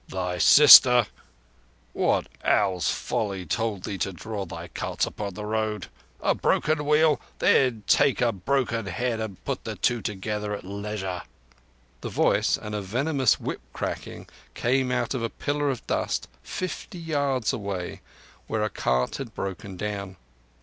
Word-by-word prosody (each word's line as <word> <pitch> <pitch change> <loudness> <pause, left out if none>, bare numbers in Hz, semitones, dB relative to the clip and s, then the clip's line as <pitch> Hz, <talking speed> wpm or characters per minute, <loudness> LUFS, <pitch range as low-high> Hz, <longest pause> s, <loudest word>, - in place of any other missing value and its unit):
Thy 90 -1 -3 1.5
sister—What - - +1 0.2
Owl's 95 -5 +2
folly 100 -4 -2
told 110 -4 -2
thee 100 -2 -4
to 95 - -1
draw 100 +2 -5
thy - - -7
carts - - -2
across 100 -2 -5
the 105 +2 -6
road? 110 0 -2 0.3
A - - +2
broken 150 -1 +1
wheel? 150 -2 +4 0.2
Then 125 -5 +3
take 135 - +3
a 120 -2 +3
broken 115 +1 -1
head 120 +1 -2
and 110 -5 -6
put - - -3
the - - -5
two 120 -2 0
together 105 +1 -3
at - - -9
leisure!" 100 -2 -4 0.8
The - - -4
voice - - +2
and 105 -1 -7
a 105 - -2
venomous 130 +5 +1
whip - - -4
cracking - - -5 0.3
came 130 +1 +1
out 125 - 0
of 130 - -2
a 115 - -1
pillar 145 +3 -1
of 130 -3 -4
dust - - -1
fifty 180 - -5
yards 140 -7 0
away, 100 -4 -4 0.5
where 110 -1 -1
a 105 - -1
cart 65 0 0
had 130 -6 -7
broken 95 0 -5
down. 100 -1 -4
105 Hz, 150 wpm, -26 LUFS, 100-125 Hz, 1.5 s, wheel